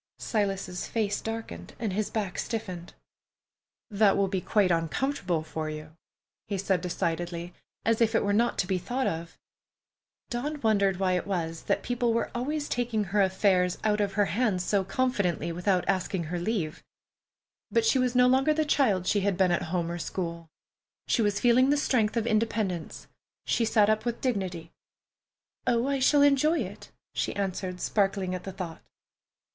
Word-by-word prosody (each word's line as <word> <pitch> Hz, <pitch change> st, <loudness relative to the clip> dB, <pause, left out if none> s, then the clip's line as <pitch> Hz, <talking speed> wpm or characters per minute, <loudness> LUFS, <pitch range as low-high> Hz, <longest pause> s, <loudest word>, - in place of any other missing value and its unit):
Silas's 195 Hz, -4 st, -2 dB
face 210 Hz, -3 st, -1 dB
darkened 225 Hz, 0 st, -6 dB
and 220 Hz, -5 st, -2 dB
his 210 Hz, +1 st, -1 dB
back 205 Hz, -5 st, -3 dB
stiffened. 185 Hz, -7 st, -5 dB, 1.0 s
"That 205 Hz, -1 st, +4 dB
will 200 Hz, -, +2 dB
be 190 Hz, -1 st, -2 dB
quite 200 Hz, -3 st, +2 dB
uncomfortable 175 Hz, -, 0 dB
for 155 Hz, 0 st, -4 dB
you," 155 Hz, +1 st, -8 dB, 0.5 s
he 200 Hz, -, -2 dB
said 190 Hz, -2 st, 0 dB
decidedly, 175 Hz, 0 st, -3 dB, 0.3 s
as 225 Hz, 0 st, +2 dB
if 225 Hz, 0 st, +3 dB
it -, -, +3 dB
were 200 Hz, -, +1 dB
not 235 Hz, +3 st, +2 dB
to -, -, +1 dB
be 185 Hz, 0 st, 0 dB
thought 250 Hz, +8 st, -2 dB
of. 165 Hz, 0 st, -3 dB, 0.9 s
Dawn 290 Hz, +5 st, -3 dB
wondered 200 Hz, -4 st, +2 dB
why 190 Hz, -1 st, +1 dB
it 180 Hz, +1 st, -1 dB
was 165 Hz, -4 st, -2 dB
that -, -, 0 dB
people 240 Hz, -1 st, 0 dB
were 230 Hz, -, -1 dB
always 290 Hz, +5 st, -2 dB
taking 240 Hz, -3 st, 0 dB
her 200 Hz, +2 st, +1 dB
affairs 185 Hz, -1 st, +2 dB
out 210 Hz, -1 st, +2 dB
of 200 Hz, -1 st, -1 dB
her 205 Hz, 0 st, +3 dB
hands 195 Hz, 0 st, 0 dB
so 200 Hz, +1 st, +1 dB
confidently, 190 Hz, -, 0 dB
without 180 Hz, +2 st, 0 dB
asking 190 Hz, -2 st, 0 dB
her 175 Hz, +2 st, -3 dB
leave. 175 Hz, -5 st, -2 dB, 0.9 s
But 460 Hz, -, +2 dB
she 275 Hz, -12 st, +3 dB
was 250 Hz, -1 st, +1 dB
no 250 Hz, 0 st, +6 dB
longer 265 Hz, +4 st, +3 dB
the 310 Hz, 0 st, +1 dB
child 215 Hz, -11 st, +2 dB
she 205 Hz, -, +2 dB
had 195 Hz, -2 st, 0 dB
been 190 Hz, -2 st, +3 dB
at 175 Hz, -, +1 dB
home 170 Hz, -1 st, -1 dB
or 175 Hz, -, -4 dB
school. 170 Hz, -2 st, -4 dB, 0.6 s
She -, -, +1 dB
was 205 Hz, -1 st, +1 dB
feeling 250 Hz, +3 st, +4 dB
the 290 Hz, -, +3 dB
strength 235 Hz, -6 st, +1 dB
of 230 Hz, -, +1 dB
independence. 215 Hz, -6 st, -1 dB, 0.4 s
She 230 Hz, -, +1 dB
sat 215 Hz, -2 st, +4 dB
up 215 Hz, 0 st, +2 dB
with 240 Hz, -1 st, -2 dB
dignity. 185 Hz, -9 st, -2 dB, 1.0 s
"Oh, 235 Hz, 0 st, +2 dB
I 275 Hz, 0 st, 0 dB
shall 285 Hz, +2 st, +5 dB
enjoy 285 Hz, +4 st, +4 dB
it," -, -, -7 dB, 0.2 s
she -, -, -2 dB
answered, 185 Hz, -2 st, -3 dB
sparkling 195 Hz, -2 st, 0 dB
at 180 Hz, -1 st, -5 dB
the 195 Hz, -, -4 dB
thought. 180 Hz, -3 st, -7 dB
200 Hz, 175 wpm, -28 LUFS, 180-235 Hz, 1.0 s, no